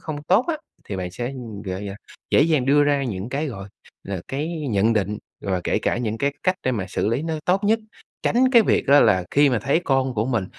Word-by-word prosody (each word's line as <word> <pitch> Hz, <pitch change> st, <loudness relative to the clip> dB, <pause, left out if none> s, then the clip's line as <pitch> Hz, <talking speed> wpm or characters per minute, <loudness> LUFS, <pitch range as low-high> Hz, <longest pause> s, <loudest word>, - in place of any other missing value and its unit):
không 150 Hz, -2 st, -6 dB
tốt 190 Hz, +10 st, +3 dB
á, 320 Hz, -, 0 dB, 0.3 s
thì 100 Hz, -, -5 dB
bạn 90 Hz, -1 st, -4 dB
sẽ, 120 Hz, +7 st, -4 dB, 0.3 s
gợi 95 Hz, +2 st, -4 dB
à, 100 Hz, -, -7 dB, 0.3 s
dễ -, -, +5 dB
dàng 150 Hz, -5 st, +2 dB
đưa 145 Hz, +1 st, +5 dB
ra 145 Hz, -1 st, +2 dB
những 100 Hz, -2 st, -4 dB
cái, 145 Hz, +4 st, -2 dB
gọi 100 Hz, -4 st, -7 dB, 0.4 s
là, 95 Hz, -3 st, -4 dB
cái 145 Hz, +4 st, -2 dB, 0.2 s
nhận 105 Hz, +3 st, +3 dB
định, 105 Hz, -1 st, -1 dB, 0.2 s
rồi 95 Hz, -2 st, -1 dB
kể -, -, +1 dB
cả -, -, 0 dB
những 110 Hz, -2 st, -2 dB
cái 140 Hz, +2 st, 0 dB
cách 185 Hz, 0 st, +2 dB
để 130 Hz, -, +1 dB
mà 100 Hz, -5 st, -2 dB
xử 100 Hz, -, -1 dB
lý 120 Hz, +6 st, 0 dB
nó 160 Hz, -1 st, -2 dB
tốt 190 Hz, +3 st, +1 dB
nhất. 220 Hz, +2 st, +3 dB, 0.4 s
Tránh 255 Hz, +2 st, +3 dB
cái 235 Hz, -2 st, +7 dB
việc -, -, +1 dB
á 145 Hz, +1 st, +7 dB
là 95 Hz, -5 st, +4 dB
khi 145 Hz, 0 st, +4 dB
mà 125 Hz, -, +1 dB
thấy 140 Hz, -, +1 dB
con 135 Hz, -2 st, +1 dB
của 110 Hz, +2 st, 0 dB
mình 115 Hz, -7 st, 0 dB
130 Hz, 245 wpm, -23 LUFS, 105-150 Hz, 0.4 s, cái